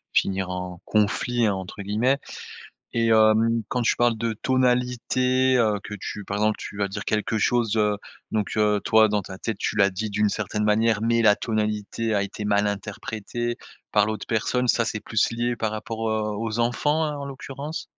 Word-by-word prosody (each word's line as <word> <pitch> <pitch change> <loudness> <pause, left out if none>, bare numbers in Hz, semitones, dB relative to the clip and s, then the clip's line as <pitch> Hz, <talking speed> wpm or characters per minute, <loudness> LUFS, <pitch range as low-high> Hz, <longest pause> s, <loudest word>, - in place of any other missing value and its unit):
finir 95 -1 +1
«en 90 -1 -5
conflit» 110 +2 +1
entre 95 +1 -4
guillemets 115 +8 +1 0.8
et 115 0 +2
hem, 110 +1 +4
quand 125 - -1
tu - - +2
parles 120 -1 +2
de 115 0 -1
tonalité, 125 +1 +1
heu, 105 -3 +2
que - - -8
tu 105 - -5
par 100 +1 -3
exemple, 110 0 +2
tu 100 - -8
vas 100 -1 0
dire 100 +1 -5
quelque 110 +1 0
chose, 115 0 +1
heu, 105 -1 +2 0.3
donc 110 0 -1
heu, 105 -1 +3
toi 110 -1 +5
dans 105 0 +1
ta 95 0 -9
tête, 110 0 -4
tu - - -2
l'as 100 -1 +4
dit 105 +4 -3
d'une 105 0 +1
certaine 105 0 -2
manière, 110 0 +2
mais 115 0 +2
la 105 -2 +5
tonalité 110 0 -2
a 100 - +2
été 105 +1 -5
mal 105 0 +2
interprétée 110 +3 -4 0.3
par 105 0 +4
l'autre 110 0 -4
personne, 125 +2 0
ça, 115 -1 +3
c'est 110 - -3
plus 110 0 +1
lié 120 +1 -1
par 110 -2 -2
rapport, 110 +1 -4
heu, 110 -1 -1
aux 115 0 -3
enfants 145 +7 +1
hein, 150 -1 -2
en 140 - -5
l'occurrence? 140 +3 -6
110 Hz, 190 wpm, -24 LUFS, 105-120 Hz, 0.8 s, toi